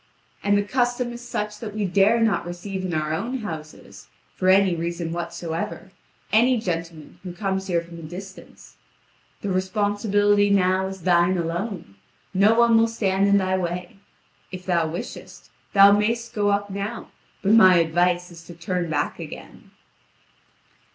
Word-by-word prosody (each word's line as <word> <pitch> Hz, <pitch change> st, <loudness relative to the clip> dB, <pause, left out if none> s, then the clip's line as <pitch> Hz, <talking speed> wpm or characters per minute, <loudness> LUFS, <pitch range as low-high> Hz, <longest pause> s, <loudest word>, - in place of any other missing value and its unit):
And 205 Hz, 0 st, +2 dB
the 205 Hz, -, +1 dB
custom 245 Hz, +2 st, -1 dB
is 240 Hz, -, -9 dB
such 210 Hz, -3 st, -4 dB
that 210 Hz, -2 st, -7 dB
we 210 Hz, -1 st, -1 dB
dare 200 Hz, +5 st, +3 dB
not 220 Hz, -6 st, +1 dB
receive 185 Hz, +2 st, -5 dB
in 185 Hz, -, -3 dB
our 155 Hz, -1 st, -1 dB
own 230 Hz, +11 st, -2 dB
houses, 155 Hz, -6 st, -9 dB, 0.3 s
for 185 Hz, -, +1 dB
any 190 Hz, -1 st, +4 dB
reason 170 Hz, 0 st, -3 dB
whatsoever, 170 Hz, +1 st, -5 dB, 0.4 s
any 240 Hz, +3 st, +4 dB
gentleman 165 Hz, -5 st, -5 dB
who 180 Hz, -2 st, -7 dB
comes 190 Hz, 0 st, -2 dB
here 170 Hz, -3 st, +1 dB
from 170 Hz, 0 st, -11 dB
a -, -, -9 dB
distance. 185 Hz, +5 st, -11 dB, 0.6 s
The 200 Hz, -, -3 dB
responsibility 205 Hz, +1 st, +1 dB
now 190 Hz, -1 st, +2 dB
is 190 Hz, -2 st, -8 dB
thine 175 Hz, +1 st, +3 dB
alone; 170 Hz, -, -4 dB, 0.4 s
no 200 Hz, +4 st, +4 dB
one 235 Hz, -1 st, +5 dB
will 225 Hz, -, +4 dB
stand 200 Hz, -3 st, 0 dB
in 200 Hz, 0 st, +4 dB
thy 190 Hz, -1 st, +1 dB
way. 180 Hz, +1 st, -4 dB, 0.5 s
If 185 Hz, -1 st, -8 dB
thou 170 Hz, -3 st, +1 dB
wishest, 165 Hz, +2 st, -8 dB, 0.2 s
thou 200 Hz, 0 st, +8 dB
mayst 230 Hz, +3 st, 0 dB
go 205 Hz, -1 st, +1 dB
up 205 Hz, 0 st, 0 dB
now; 200 Hz, +4 st, -5 dB, 0.3 s
but 200 Hz, -, +2 dB
my 190 Hz, -5 st, +7 dB
advice 175 Hz, +2 st, +1 dB
is 165 Hz, -1 st, -12 dB
to 175 Hz, -, -11 dB
turn 175 Hz, 0 st, -3 dB
back 145 Hz, -2 st, -2 dB
again." -, -, -10 dB
190 Hz, 160 wpm, -23 LUFS, 175-205 Hz, 0.6 s, thou